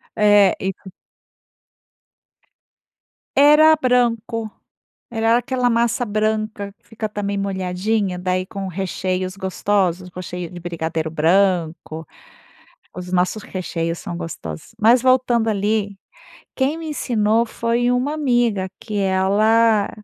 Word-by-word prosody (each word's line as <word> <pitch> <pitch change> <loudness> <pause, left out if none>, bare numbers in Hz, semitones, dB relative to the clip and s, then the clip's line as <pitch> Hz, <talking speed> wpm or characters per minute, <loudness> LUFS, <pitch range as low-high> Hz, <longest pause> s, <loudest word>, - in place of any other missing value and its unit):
é, 205 -3 +5
e 190 - -3
c 190 0 -6 2.5
Era 300 +2 +7
branco, 235 -4 0 0.6
era 225 +1 +2
aquela 250 0 0
massa 235 +1 +1
branca 215 -1 -2
que - - -39
fica 225 -1 -4
também 200 -1 -3
molhadinha, 190 0 -1
daí 185 0 -1
com 195 0 -6
recheios 185 0 -3
gostosos, 190 -2 -1
recheio 180 -1 -6
de 175 - -8
brigadeiro 160 -2 -3
branco. 165 -1 +1 0.9
Os 180 0 -7
nossos 185 +4 0
recheios 170 -3 -4
são 170 - -6
gostosos. 80 - -7
Mas 230 +3 +5
voltando 250 -3 +2
ali, 205 -1 -1 0.6
quem 280 +4 0
me 325 -1 -6
ensinou 230 -5 +1
foi 235 +2 0
uma 255 +4 0
amiga 240 -10 +1
que 210 -2 -5
ela 205 +3 +3
205 Hz, 110 wpm, -20 LUFS, 185-230 Hz, 2.5 s, Era